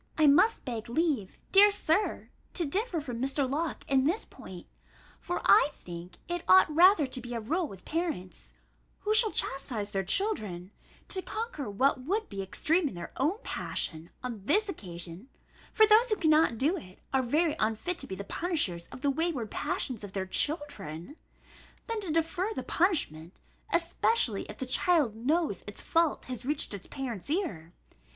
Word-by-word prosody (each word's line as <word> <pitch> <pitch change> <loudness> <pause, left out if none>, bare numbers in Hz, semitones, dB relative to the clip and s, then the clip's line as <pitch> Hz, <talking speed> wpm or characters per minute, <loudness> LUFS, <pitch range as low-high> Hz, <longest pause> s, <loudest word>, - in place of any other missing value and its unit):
I 310 - +5
must 365 +11 +5
beg 235 -3 -5
leave, 265 - 0
dear 410 +1 +8
Sir, 400 0 0 0.2
to 345 - 0
differ 365 - -1
from 245 -4 -5
Mr. 270 +1 +1
Locke 310 +5 -3
in 265 -1 +3
this 350 +9 0
point; 180 -2 -11 0.5
for 355 - -4
I - - +6
think 175 0 -10
it 350 0 -2
ought 190 +11 +6
rather 355 -2 +6
to 255 -1 -5
be 240 0 -6
a - - -1
rule 315 +10 -1
with 190 -6 -12
parents, 315 - -4 0.5
who 425 - +1
shall 440 0 +5
chastise 235 -6 -1
their 195 -2 -1
children, 190 - -1 0.4
to 380 - +3
conquer 430 - -5
what 255 +6 +1
would 410 - -1
be 195 - -4
extreme 315 - +1
in 230 - -6
their 170 -1 -7
own 305 +10 +1
passion 160 +1 -4
on 235 -5 -5
this 415 - +3
occasion 180 - -8 0.4
(for 435 - +6
those 440 +3 +5
who 430 - +3
cannot 315 - +3
do 295 +10 +2
it, 185 - -11 0.2
are 265 - +4
very 300 +6 +1
unfit 225 +12 -1
to - - -5
be 190 - -5
the 200 - -6
punishers 200 - -2
of - - -11
the 285 -1 +2
wayward 280 -7 -2
passions 240 -5 -3
of 200 -1 -8
their 190 -1 -2
children), 285 - -2 0.7
than 455 -2 -3
to 380 -6 -4
defer 330 +5 0
the - - -3
punishment, 200 - 0 0.4
especially 340 - +1
if 210 - -10
the 260 - -4
child 270 -2 +2
knows 285 - 0
its 205 - -7
fault 330 -2 +1
has 255 -1 -6
reached 285 -3 -1
its 200 -2 -8
parent's 250 -6 -5
ear. 240 - -2
280 Hz, 175 wpm, -29 LUFS, 205-345 Hz, 0.7 s, dear